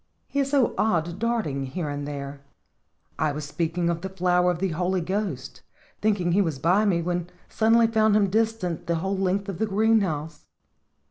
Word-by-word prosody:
He 280 - -2
is 275 -1 +1
so 275 -4 +2
odd 175 -4 0
darting 220 -13 -1
here 155 +4 -4
and 145 0 -4
there. 140 -1 -6 0.8
I 155 -1 +2
was 150 +1 -5
speaking 170 +3 -1
of 170 -1 -1
the 190 - -4
flower 180 -1 +2
of 175 - 0
the 190 +2 -1
Holy 180 +3 0
Ghost, 180 -7 -3 0.4
thinking 200 -5 +1
he 195 +4 +4
was 160 -7 -1
by 180 +9 +3
me, 175 -5 +1
but 175 0 -2 0.2
sud 220 0 +2
denly 230 -1 +4
found 220 -2 +4
him 200 -3 +3
distant 215 -6 -1
the 170 - +1
whole 190 +4 -1
length 195 +1 0
of 195 -4 -5
the 220 - +1
greenhouse. 195 -8 0
180 Hz, 190 wpm, -25 LUFS, 165-210 Hz, 0.8 s, he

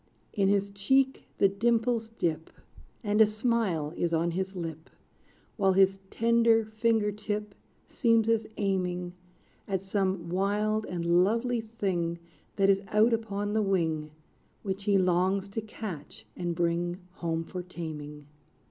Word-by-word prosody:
In 200 -3 +2
his 200 0 +1
cheek 265 +7 +1
the 195 - +5
dimples 230 +2 +1
dip, 160 -1 -1 0.5
And 210 0 +2
a 220 - +8
smile 215 -8 0
is 170 -1 0
on 170 +1 +1
his 190 +2 -3
lip, 165 -2 -6 0.7
While 195 -3 +3
his 195 0 +4
tender 230 -1 +3
finger 220 -1 +1
tip 210 0 -4 0.3
Seems 230 -3 +2
as 225 -1 +2
aiming 180 -3 -1 0.5
At 195 -2 -1
some 190 -3 -1
wild 210 +4 0
and 170 -2 -3 0.2
lovely 230 +4 0
thing 190 -7 -2 0.4
That 195 -1 +3
is 195 0 +4
out 215 +4 +4
upon 205 -2 -2
the 220 - +2
wing, 165 -6 0 0.5
Which 195 -1 -4
he 200 -2 +4
longs 185 +2 +2
to 225 +3 -3
catch 210 -8 -8
and 175 -1 -3
bring 175 +1 0 0.2
Home 165 -1 -2
for 180 +2 -6
taming. 150 -4 -7
195 Hz, 140 wpm, -29 LUFS, 175-220 Hz, 0.7 s, a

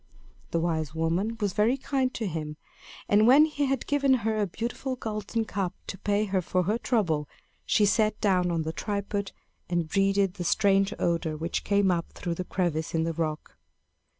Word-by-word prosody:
The 170 - 0
wise 160 -2 -1
woman 175 +8 0
was 205 -4 -1
very 220 +5 +2
kind 265 -1 0
to 225 - -2
him; 155 -4 -4 0.5
and 210 +2 +4
when 280 +5 +8
he 295 -2 -1
had 270 -2 -1
given 280 -2 +3
her 220 -1 +1
a 205 - +1
beautiful 240 +7 -4
golden 220 -1 -3
cup 195 -4 -3
to 195 - -6
pay 205 +1 +1
her 190 -2 0
for 180 +1 0
her 210 +6 0
trouble, 170 - 0 0.4
she 210 - +4
sat 215 +1 +2
down 185 -4 +2
on 165 -2 0
the 160 +1 -4
tripod 200 +1 -3 0.4
and 175 -2 0
breathed 195 +1 +1
the 180 - -3
strange 195 +2 +3
odor 165 -2 0
which 165 +2 -2
came 200 -2 +3
up 170 -1 -2
through 175 -1 -3
the 185 - -4
crevice 170 -4 -2
in 160 - +2
the 165 0 -1
rock. 155 -1 -3
195 Hz, 185 wpm, -27 LUFS, 170-215 Hz, 0.5 s, when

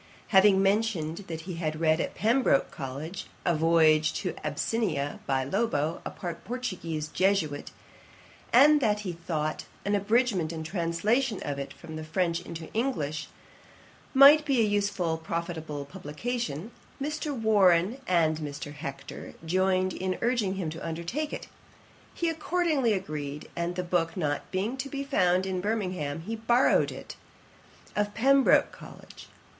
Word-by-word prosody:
Having 195 -1 +6
mentioned 195 -6 +1
that 165 -1 -5
he 175 0 -6
had 155 -2 -2
read 160 0 +3
at - - -4
Pembroke 230 - +2
College 145 +8 -6 0.2
a 175 - +3
Voyage 155 -1 +4
to 180 - -3
Abyssinia, 150 -1 -1
by 135 -1 +1
Lobo, 160 - -1
a - - -4
Portuguese 175 -4 -4
Jesuit, 185 -5 0 0.8
and 290 +4 +7
that 210 -3 +2
he 185 -4 -4
thought 155 -2 -3 0.2
an 205 - +1
abridgment 205 -4 +2
and 160 -1 -5
translation 195 +8 0
of 140 -1 -3
it 140 - -5
from 160 -2 -9
the 155 - -5
French 170 +2 0
into 165 -2 -8
English 155 - -1 0.8
might 285 +3 +8
be 265 -6 +2
an 205 - -1
useful 200 -5 0
and 160 0 -5
profitable 165 -5 -4
publication, 185 - -4 0.3
Mr. 300 +1 -3
Warren 205 +1 +3
and 160 -3 +2
Mr. 145 -1 -6
Hector 140 -2 -8
joined 185 +2 +1
in 185 0 -2
urging 230 -6 +1
him 175 -5 -3
to 165 - -8
undertake 170 - -3
it. - - -5 0.7
He 340 - -1
accordingly 320 -6 +1
agreed; 150 -6 -5
and 170 +1 -2
the 180 - -2
book 175 0 0
not 145 -4 -2
being 205 +7 -2
to 270 +1 -4
be 275 0 -3
found 185 -9 +2
in 185 -1 -2
Birmingham, 185 -8 -2
he 220 +7 -4
borrowed 235 +3 +3
it - - -9 0.8
of 205 0 -1
Pembroke 270 +3 +4
College. - - -13
180 Hz, 145 wpm, -28 LUFS, 160-225 Hz, 0.8 s, might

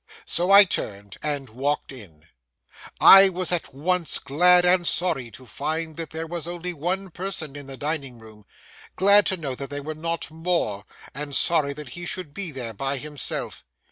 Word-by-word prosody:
So 175 +2 -1
I 200 +1 +10
turned 100 - -5
and 145 -3 -2
walked 140 +7 -2
in. 90 - -13 0.7
I 195 0 +9
was 185 -1 -3
at 175 -2 -2
once 170 +5 0
glad 180 +5 +4
and 180 -1 +3
sorry 165 -9 0
to 130 +3 -14
find 160 +6 -3
that 165 -2 -5
there 160 +1 -5
was 170 -1 -5
only 175 +1 -4
one 180 +4 -3
person 170 -5 -5
in 145 -1 -9
the 135 -1 -7
dining 145 -4 -3
room; 110 -2 -16 0.5
glad 200 +1 +5
to 190 - 0
know 145 -6 -4
that 135 +2 -7
there 145 0 -6
were 155 +2 -4
not 165 +1 -4
more, 160 - -2 0.3
and 145 0 -5
sorry 150 -4 +2
that 150 -2 -9
he 175 +7 -7
should 180 -6 -5
be 195 -2 -3
there 125 -5 -6
by 135 +5 -2
himself. 145 0 -4
155 Hz, 180 wpm, -24 LUFS, 135-175 Hz, 0.7 s, I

